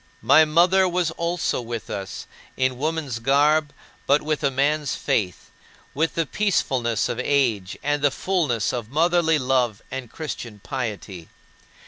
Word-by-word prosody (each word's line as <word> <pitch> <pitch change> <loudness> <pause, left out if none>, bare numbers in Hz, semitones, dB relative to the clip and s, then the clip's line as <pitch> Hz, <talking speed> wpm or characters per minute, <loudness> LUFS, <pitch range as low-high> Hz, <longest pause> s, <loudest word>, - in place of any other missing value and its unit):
My 155 - +6
mother 180 +4 +4
was 175 -2 0
also 170 -4 -1
with 115 -2 -6
us 95 -2 -5 0.3
in 130 -1 0
woman's 150 -5 -2
garb, 145 +4 +3 0.4
but 140 +2 +3
with 155 0 -2
a 140 - +3
man's 140 +2 0
faith, 95 -5 -2 0.4
with 160 +3 0
the 165 - +1
peacefulness 130 - 0
of - - -4
age 115 -10 0
and 145 0 0
the 145 - +4
fullness 145 - -1
of 120 -3 -4
motherly 165 +2 +2
love 125 -5 0
and 130 -3 -6
Christian 120 -8 -6
piety. 105 -8 -5
140 Hz, 140 wpm, -23 LUFS, 120-160 Hz, 0.4 s, My